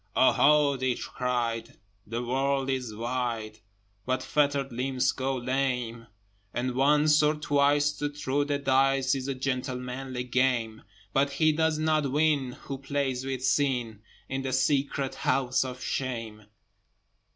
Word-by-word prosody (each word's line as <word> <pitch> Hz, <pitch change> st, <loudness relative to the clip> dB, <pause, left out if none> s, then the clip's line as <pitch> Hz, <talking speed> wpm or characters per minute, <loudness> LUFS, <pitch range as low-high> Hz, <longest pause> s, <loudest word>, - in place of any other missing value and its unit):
"Oho!" 145 Hz, +1 st, +4 dB
they 130 Hz, -1 st, 0 dB
cried, 120 Hz, -2 st, -3 dB, 0.3 s
"The 115 Hz, +3 st, -3 dB
world 135 Hz, +2 st, 0 dB
is 125 Hz, -5 st, -3 dB
wide, 115 Hz, -2 st, -3 dB, 0.4 s
But 130 Hz, 0 st, -1 dB
fettered 140 Hz, -2 st, +1 dB
limbs 130 Hz, +1 st, 0 dB
go 135 Hz, 0 st, -2 dB
lame! 125 Hz, -2 st, -2 dB, 0.5 s
And 125 Hz, +1 st, -1 dB
once, 150 Hz, +3 st, +4 dB
or 150 Hz, +1 st, +3 dB
twice, 145 Hz, 0 st, +2 dB
to 145 Hz, -, -1 dB
throw 145 Hz, -1 st, -1 dB
the 145 Hz, 0 st, -1 dB
dice 135 Hz, -1 st, +2 dB
Is 135 Hz, -1 st, -3 dB
a 135 Hz, -, -2 dB
gentlemanly 130 Hz, -1 st, -3 dB
game, 125 Hz, -3 st, 0 dB, 0.3 s
But 140 Hz, +1 st, +2 dB
he 155 Hz, +3 st, +3 dB
does 160 Hz, 0 st, +1 dB
not 155 Hz, -3 st, +1 dB
win 145 Hz, -3 st, +1 dB
who 135 Hz, -1 st, -5 dB
plays 135 Hz, -2 st, -2 dB
with 130 Hz, -1 st, -3 dB
Sin 125 Hz, -7 st, 0 dB, 0.3 s
In 135 Hz, 0 st, -3 dB
the 130 Hz, -1 st, -3 dB
secret 135 Hz, 0 st, +1 dB
House 130 Hz, -1 st, +1 dB
of 130 Hz, -1 st, -7 dB
Shame." 115 Hz, -5 st, -4 dB
130 Hz, 135 wpm, -28 LUFS, 125-140 Hz, 0.5 s, Oho